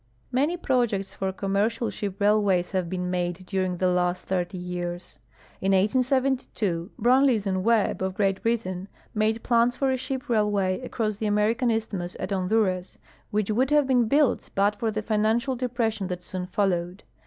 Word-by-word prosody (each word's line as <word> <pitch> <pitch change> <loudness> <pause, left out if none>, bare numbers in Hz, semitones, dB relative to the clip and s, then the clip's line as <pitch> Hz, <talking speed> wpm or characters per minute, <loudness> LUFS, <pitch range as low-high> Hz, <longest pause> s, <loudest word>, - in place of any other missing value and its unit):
Many 290 +8 +1
])r()jects 240 - 0
for 190 0 -2
commercial 205 +5 0
sliii) 200 -3 -4
railways 200 -3 +2
have 185 -3 -1
been 180 0 -2
made 180 0 -2
during 185 -1 -1
the 185 - 0
last 180 0 0
thirty 180 0 -2
years. 175 0 -5 0.4
In 195 +1 +2
1872 240 -4 +1
Brunlees 245 -2 +4
and 190 -1 0
^Vebb, 225 -3 +2
of 190 0 -2
Great 195 -2 +1
Britain, 195 -5 -1 0.3
made 220 +1 0
plans 235 0 +3
for 270 0 +1
a 260 - +1
sliii) 260 +2 -4
railway 205 -5 +1
across 220 -4 -2
the 215 - -2
American 215 +4 +2
isthmus 205 -6 -2
at - - -4
Honduras, 185 -1 0 0.3
which 210 0 0
would 255 +5 +2
haye 295 0 +5
l)een 250 -3 +3
built 285 0 +2
but 200 +1 +3
for 225 +1 -1
the 215 0 -3
financial 220 +5 +1
depression 230 -5 -1
that. 180 -1 -5
soon 180 0 -5
followed. 180 -1 -1
210 Hz, 165 wpm, -26 LUFS, 185-235 Hz, 0.4 s, haye